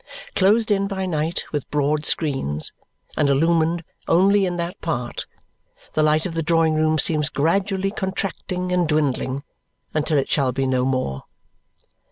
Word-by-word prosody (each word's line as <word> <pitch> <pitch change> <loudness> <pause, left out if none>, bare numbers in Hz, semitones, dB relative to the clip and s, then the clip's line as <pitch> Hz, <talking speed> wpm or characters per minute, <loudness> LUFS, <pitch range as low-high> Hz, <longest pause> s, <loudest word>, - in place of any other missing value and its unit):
Closed 215 +3 +3
in 200 -1 +2
by 190 -1 -3
night 160 -1 -1
with 145 -3 -3
broad 150 +1 +1
screens, 135 - 0 0.4
and 145 -2 +2
illumined 165 +3 +2 0.2
only 195 +3 +4
in 175 -1 -3
that 170 +1 -4
part, 125 -8 -3 0.7
the 155 - +2
light 155 +1 +3
of 180 - -3
the 165 - -1
drawing 165 0 +2
room 155 0 +2
seems 150 -1 +1
gradually 195 +5 0
contracting 185 -2 -3
and 180 -2 +2
dwindling 140 -3 0 0.5
until 155 0 +1
it 135 - +1
shall 135 -4 +1
be 135 +2 -1
no 130 -1 +1
more. 130 - -2
160 Hz, 150 wpm, -22 LUFS, 145-180 Hz, 0.7 s, only